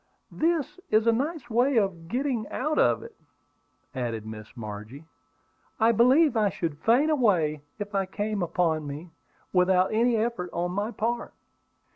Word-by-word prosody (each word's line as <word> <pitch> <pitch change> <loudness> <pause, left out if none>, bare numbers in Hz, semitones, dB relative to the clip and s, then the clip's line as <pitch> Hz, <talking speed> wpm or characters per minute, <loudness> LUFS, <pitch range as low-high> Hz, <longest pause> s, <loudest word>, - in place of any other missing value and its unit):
"That 325 -3 +1 0.2
is 215 +1 +3
a 230 - +5
nice 280 +3 -2
way 245 +4 +2
to 205 -4 +4 0.2
get 250 +10 -2 0.3
out 310 0 -1
of - - +3
it," 465 -1 -12 0.8
added 115 -5 -3
Miss 110 +2 -10
Margie. 110 +6 -8 0.7
"I 225 +1 +5
believe 255 +5 +4
I 215 -2 +3
should 160 -5 -4
faint 265 +8 +3
away 175 - +2 0.2
if 205 0 -6
I 195 -1 0
came 205 +1 -3
upon 165 -3 0
one, 150 +5 -7 0.4
without 185 +1 +3
any 230 +1 +3
effort 220 -5 -2
on 175 +1 -1
my 205 +4 -2
part." 235 +1 -3
205 Hz, 150 wpm, -27 LUFS, 165-240 Hz, 0.8 s, a